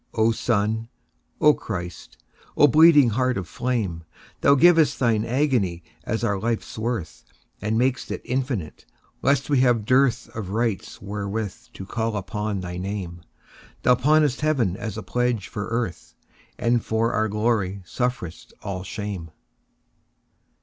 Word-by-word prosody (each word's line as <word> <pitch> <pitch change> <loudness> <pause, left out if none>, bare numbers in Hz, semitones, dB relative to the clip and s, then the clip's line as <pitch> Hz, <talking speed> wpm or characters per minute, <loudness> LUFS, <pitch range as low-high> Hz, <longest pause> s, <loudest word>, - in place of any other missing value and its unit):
O 110 0 +3
Sun, 110 0 0 0.5
O 150 0 +6
Christ, 90 - -7 0.4
O - - +7
bleeding 150 -2 +7
Heart 125 +2 0
of 95 -4 -4
flame! 110 -10 -2 0.4
Thou 140 - +5
giv'st 160 -1 +5
Thine 115 -4 +2
agony 115 - 0 0.2
as 110 +2 -2
our 100 -4 0
life's 115 +2 -2
worth, 110 -5 -4 0.4
And 110 +1 0
mak'st 130 +1 0
it - - -5
infinite, 125 - -3 0.3
lest 140 0 +2
we 145 -3 +2
have 120 -4 +3
dearthOf 125 -5 +1
rights 110 -2 -2
wherewith 100 0 -3 0.2
to 95 - -8
call 110 +1 -2
upon 105 +1 -3
thy 90 -1 -5
Name; 90 -2 -5 0.6
Thou 125 - +6
pawnest 145 +2 +3
Heaven 130 - +1
as 110 0 -5
a - - -5
pledge 120 -4 -1
for 105 - -5
Earth, 115 -6 -4 0.4
And 120 -1 +1
for 110 +1 0
our 110 0 +1
glory 105 -3 0
sufferest 120 -6 -4
all 95 -2 -4
shame. 95 -3 -5
110 Hz, 135 wpm, -24 LUFS, 100-125 Hz, 0.6 s, O